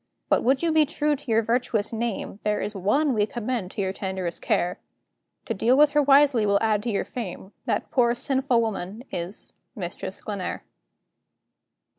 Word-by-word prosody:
But - - +3
would 265 +5 +2
you 335 - +2
be 310 -1 +4
true 300 0 0
to 280 -2 -11
your 225 0 +3
virtuous 230 -2 0
name, 225 -3 -3
There 210 0 0
is 210 - -3
one 235 +10 +1
we 210 -2 +2
commend 235 -4 -3
to 200 - -4
your 190 -1 -1
tenderest 190 -3 -4
care; 180 +1 0 0.7
To - - -2
deal 250 +3 +3
with 295 0 +6
her 295 - +4
wisely 280 -4 +5
will 200 -1 +3
add 215 -1 +1
to 235 - -3
your 200 - -1
fame: 195 -4 -6
That - - -1
poor 240 -2 +3
sinful 265 -1 +1
woman 215 0 -4
is 175 +4 -5 0.2
Mistress 185 0 -5
Glenare. 200 -4 -4
225 Hz, 175 wpm, -25 LUFS, 200-265 Hz, 0.7 s, with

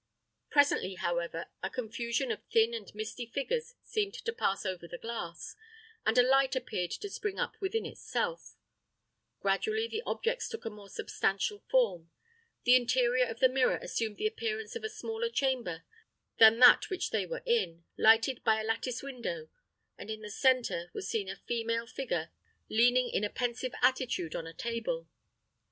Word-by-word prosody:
Presently, 285 -10 +3
however, 170 -1 -2 0.2
a 190 - -2
confusion 235 +2 -2
of 220 - -4
thin 225 +1 +4
and 225 -3 -6
misty 215 +3 -5
figures 465 - -2
seemed 410 -2 -1
to 460 - -4
pass 195 - 0
over 180 -3 -3
the 175 - -7
glass, 175 -7 -6 0.5
and 225 - +3
a 245 - +8
light 265 +1 +4
appeared 225 -9 -2
to 410 - -4
spring 400 0 -4
up - - -1
within 400 +4 -1
itself: - - -3 0.9
gradually 435 - +1
the 445 -1 -3
objects 470 +2 -1
took 455 -1 -7
a 225 - -3
more 205 -1 -12
substantial 195 - -1
form; 470 - +2 0.5
the 250 0 +7
interior 250 0 +3
of 225 0 -7
the 260 - +8
mirror 255 0 +2
assumed 220 -2 -3
the - - -3
appearance 440 0 -2
of 465 - -5
a 440 - -2
smaller 450 +1 -3
chamber 255 - -1 0.6
than 225 0 +9
that 250 0 +8
which 375 -2 -2
they - - 0
were - - -5
in, 310 - +1
lighted 225 +3 +4
by 220 0 +3
a - - -2
lattice 230 +3 -2
window, 275 - -5 0.5
and - - -8
in 215 0 -4
the 210 - -7
centre 245 -9 +2
was 190 - -4
seen 205 -3 -1
a 195 - -4
female 230 0 -1
figure 230 -10 -3 0.4
leaning 245 +3 +4
in 210 - -1
a 210 - 0
pensive 245 +1 -2
attitude 250 -11 +1
on 165 - -4
a 165 - -9
table. 235 - -3
240 Hz, 170 wpm, -31 LUFS, -, 0.9 s, than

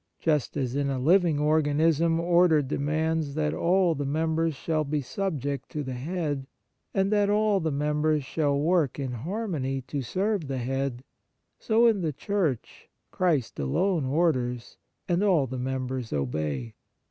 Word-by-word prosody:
Just 150 -4 0
as 130 -2 -2
in 140 0 0
a 135 - -1
living 165 +3 +3
organism 155 +2 +2
order 170 -3 +4
demands 150 +2 -1
that 150 -1 0
all 180 0 +2
the 145 -2 -3
members 160 +2 0
shall 155 +2 -1
be 150 +1 -1
subject 140 -4 -3
to 150 - -4
the 130 -1 -5
head, 145 0 -3 0.4
and 195 +1 +1
that 205 -1 +3
all 210 -1 +3
the 160 -3 -1
members 150 +1 +1
shall 145 0 0
work 160 -3 +1
in 135 -3 -3
har 180 - -4
mony 135 -7 -2
to 140 +2 -4
serve 190 - -1
the 135 -1 -3
head, 130 0 -2 0.6
so 225 +1 +3
in 220 -4 +3
the 160 -3 0
Church, 160 - -2 0.2
Christ 160 -10 0
alone 160 - +1
orders, 130 -5 0 0.3
and 175 +1 +1
all 180 -9 +3
the 130 0 -5
members 130 -1 -3
obey. 70 -2 -2
150 Hz, 155 wpm, -27 LUFS, 135-170 Hz, 0.6 s, order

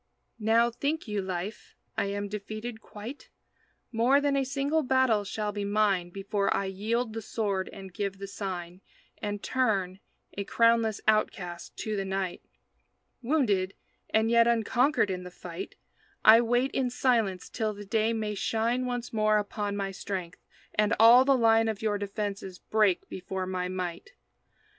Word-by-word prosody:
Now, 230 +2 +3
think 285 +5 -2
you, 210 -1 -1
Life, 190 +3 -5 0.2
I - - 0
am 205 +1 -3
defeated 215 +3 -6
quite? 220 +8 -9 0.6
More 245 +4 +4
than 285 -1 +1
a 275 - +2
single 280 +4 0
battle 260 -6 +3
shall 210 +1 -3
be 205 0 -4
mine 200 -3 +1
Before 200 +2 -1
I 200 - +1
yield 220 +5 -1
the 225 - -4
sword 200 -3 -2
and 190 -2 -10
give 195 0 -3
the 195 - -6
sign 185 -3 -6 0.4
And 205 -1 -4
turn, 195 -8 0 0.3
a 200 - -3
crownless 230 0 +2
outcast, 180 -5 0
to 215 -1 -2
the 195 - -1
night. 190 -1 -3 0.8
Wounded, 220 -9 +1 0.3
and 220 +1 +2
yet 235 0 +5
unconquered 235 +1 +2
in 180 -1 -3
the 180 - -8
fight, 180 +1 -8 0.5
I 225 +2 +9
wait 245 +3 +1
in 255 -2 0
silence 230 -7 +1
till 220 -2 -2
the 205 0 -9
day 220 +3 +1
may 215 -2 -2
shine 230 +5 0
Once 245 -1 -4
more 215 -1 +3
upon 205 0 -2
my 195 -1 -2
strength, 185 -3 -5 0.3
and 210 +1 +2
all 235 +3 +8
the 275 -1 +4
line 225 -1 +4
Of 220 -1 -3
your 205 -2 +1
defenses 200 -2 -4
break 210 -3 +1
before 190 0 -4
my 185 -1 -2
might. 180 -2 -4
210 Hz, 155 wpm, -28 LUFS, 195-230 Hz, 0.8 s, I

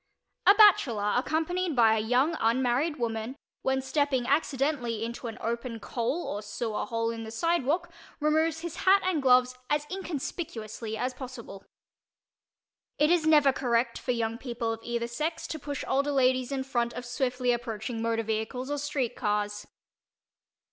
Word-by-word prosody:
A 395 - +9
bachelor, 240 - +5
accompanied 320 +5 0
by 225 -3 +5
a - - +1
young 250 +9 +2
unmarried 255 +6 +1
woman, 225 +1 -3 0.3
when 265 0 0
stepping 270 -3 +1
accidentally 270 -5 0
into 235 +1 -6
an 225 - -6
open 235 0 -3
coal 240 +9 -2
or 205 - -3
sewer 215 +1 -3
hole 230 0 -1
in 230 0 -6
the 220 - -7
sidewalk, 335 +6 0 0.3
removes 315 +1 +1
his 340 0 -6
hat 390 +1 +4
and 360 -5 +1
gloves 250 -1 +4
as 295 0 +1
inconspicuously 260 - -5
as 255 +3 -2
possible. 250 -6 -9 1.3
It 300 +2 +3
is 340 -3 +3
never 295 -3 +6
correct 235 -2 0
for - - -10
young 230 -1 -1
people 235 -3 -3
of 225 - -7
either 235 0 -2
"sex" 310 +8 -3
to 315 - -5
push 285 -1 -5
older 280 +2 +1
ladies 255 -1 +2
in 270 -1 -1
front 240 -3 -1
of 245 - -6
swiftly 250 0 0
approaching 230 -1 -3
motor 230 0 0
vehicles 220 +5 -3
or 290 - -1
street 280 -4 -2
cars. 210 0 -2
250 Hz, 155 wpm, -28 LUFS, 230-295 Hz, 1.3 s, A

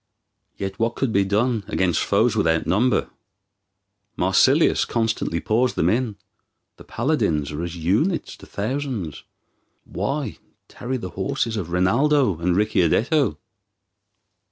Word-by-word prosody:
Yet 95 -1 -5
what 115 +1 0
could 130 -5 -1
be 100 - +3
done 110 +3 0
against 90 -2 +1
foes - - +2
without 80 0 +1
number? 120 +7 +1 1.1
Marsilius 130 - +4
constantly 110 -7 -1
pours 120 +6 +1
them 80 - +2
in. 115 -2 -1 0.6
The - - -13
paladins 100 - -1
are 75 +2 -4
as 85 0 -5
units 105 - 0
to - - -14
thousands. 110 - -4 0.6
Why 140 -5 -3 0.3
tarry 130 +2 -4
the 95 -6 -6
horses 105 +5 -2
of 95 -6 -4
Rinaldo 105 - +2
and 90 +1 +1
Ricciardetto? 105 - +2
105 Hz, 120 wpm, -22 LUFS, 90-130 Hz, 1.1 s, Marsilius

